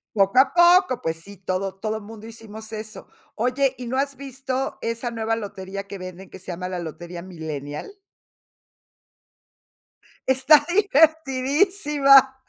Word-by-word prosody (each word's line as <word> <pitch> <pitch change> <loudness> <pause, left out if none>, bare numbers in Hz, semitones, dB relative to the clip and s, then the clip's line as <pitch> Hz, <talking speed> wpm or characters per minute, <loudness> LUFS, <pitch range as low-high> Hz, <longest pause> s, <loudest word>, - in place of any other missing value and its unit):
Poco 195 +4 +4
a 265 - +4
poco, 350 -4 +5
pues 165 0 -2
sí, 200 +5 -10
todo 190 0 -3
todo 215 +2 -3
mundo 220 +1 -11
hicimos 220 -1 -10
eso. 215 0 -7 0.3
Oye, 255 +4 +1
¿y 250 - -7
no 250 +2 -3
has 275 0 -1
visto 265 0 -4
esa 230 +1 -3
nueva 225 -1 -1
lotería 195 -2 -7
que 200 - -6
venden, 185 0 -9
que 190 - -11
se 185 -1 -6
llama 180 +1 -5
la 180 -1 -4
lotería 170 +1 -7
milenial? 160 - -7 2.3
Está 270 +3 +5
divertidísima. 295 -4 +4
225 Hz, 135 wpm, -23 LUFS, 190-275 Hz, 2.3 s, poco